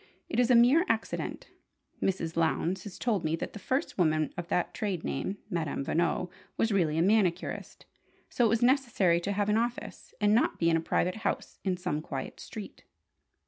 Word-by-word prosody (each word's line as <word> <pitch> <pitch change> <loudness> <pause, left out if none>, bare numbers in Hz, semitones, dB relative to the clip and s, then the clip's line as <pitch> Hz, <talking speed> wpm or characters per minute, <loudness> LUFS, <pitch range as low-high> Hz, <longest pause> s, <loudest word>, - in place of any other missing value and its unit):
It - - -1
is 245 0 +3
a 250 - +6
mere 250 +8 +6
accident. 225 0 -2 0.5
Mrs. 170 -4 -1
Lowndes 165 +3 0
has 205 - -8
told 215 -7 0
me 160 0 +1
that - - -5
the 210 - -7
first 260 +2 -2
woman 155 -3 +2
of 175 -1 -5
that 175 - 0
trade 195 -6 -2
name, 200 - -3
'Madame 165 -8 -2
Veno,' 175 +3 0 0.3
was 225 - +1
really 165 -6 +2
a 165 - +3
manicurist: 185 -3 0 0.4
so 245 - 0
it - - +6
was 225 +2 +2
necessary 240 -10 +3
to 200 - -2
have 205 0 0
an 210 +1 +3
office, 235 +1 -4
and 210 -1 +3
not 230 - +2
be 165 0 +2
in - - +3
a 165 - +1
private 180 +4 0
house 220 - -3
in 185 -2 0
some 175 -4 -2
quiet - - -6
street." - - -9
190 Hz, 190 wpm, -29 LUFS, 170-225 Hz, 0.5 s, a